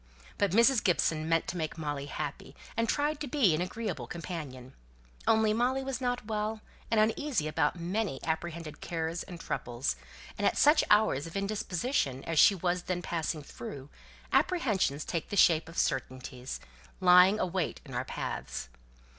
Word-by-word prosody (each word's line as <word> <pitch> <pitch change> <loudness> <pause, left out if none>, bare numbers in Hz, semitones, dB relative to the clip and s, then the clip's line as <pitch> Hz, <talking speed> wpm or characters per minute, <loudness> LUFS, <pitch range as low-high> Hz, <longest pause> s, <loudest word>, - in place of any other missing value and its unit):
But 200 - +3
Mrs. 235 +5 +4
Gibson 160 -2 +2
really 155 +1 -4
meant 165 0 +2
to 180 - -3
make 160 0 -3
Molly 145 -3 -3
happy, 145 -2 -5 0.2
and 230 0 0
tried 295 +1 +1
to 300 - -4
be 245 - +3
an 155 - 0
agreeable 220 +5 -4
companion, 145 -7 -7 0.5
only 220 -1 +4
Molly 255 +4 +1
was 265 -1 -3
not 245 -2 -1
well, 215 0 -2 0.3
and 225 - +3
was 215 +1 +5
uneasy 265 - -1
about 155 +2 0
many 185 -2 -2
apprehended 160 -1 -4
cares 165 0 -3
and 175 -3 -8
troubles 120 -3 -2 0.4
and - - +3
at - - +1
such 300 +1 +6
hours 210 -9 +4
of 165 - -5
indisposition 200 - -1
as 165 -2 0
she 200 - +7
was 180 0 0
then 180 0 -3
passing 160 -2 -2
through, 135 +1 -8 0.4
apprehensions 215 - +1
take 170 -3 -3
the 205 - -3
shape 165 -3 +5
of 165 - -11
certainties, 130 - -2 0.4
lying 180 +3 +7
await 185 -2 -1
in - - -10
our - - -1
paths. 65 - -5
175 Hz, 165 wpm, -30 LUFS, 155-220 Hz, 0.5 s, she